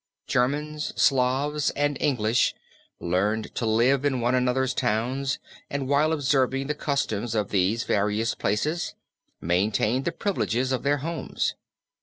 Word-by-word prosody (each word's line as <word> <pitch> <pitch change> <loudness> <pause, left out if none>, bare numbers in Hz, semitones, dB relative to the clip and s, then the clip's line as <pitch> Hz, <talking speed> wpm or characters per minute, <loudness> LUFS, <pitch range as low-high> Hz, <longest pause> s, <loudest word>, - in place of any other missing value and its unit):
Germans, 150 +4 -1
Slavs 135 +3 +2
and 145 0 +1
English 120 -4 +2 0.4
learned 100 +5 -1
to 115 - -2
live 125 +5 +3
in 135 -3 +1
one 120 +1 +1
another's 130 0 +1
towns 125 +5 0 0.3
and 140 -2 -3
while 145 +3 +3
observing 135 -3 +1
the 150 - -1
customs 120 -7 -2
of 105 -2 0
these 100 +4 +1
various 105 +3 0
places 150 +12 -1 0.5
maintained 105 - +1
the 170 - +1
privileges 130 - -1
of 130 - 0
their 145 +1 +2
homes. 165 -4 -2
130 Hz, 130 wpm, -26 LUFS, 110-145 Hz, 0.5 s, live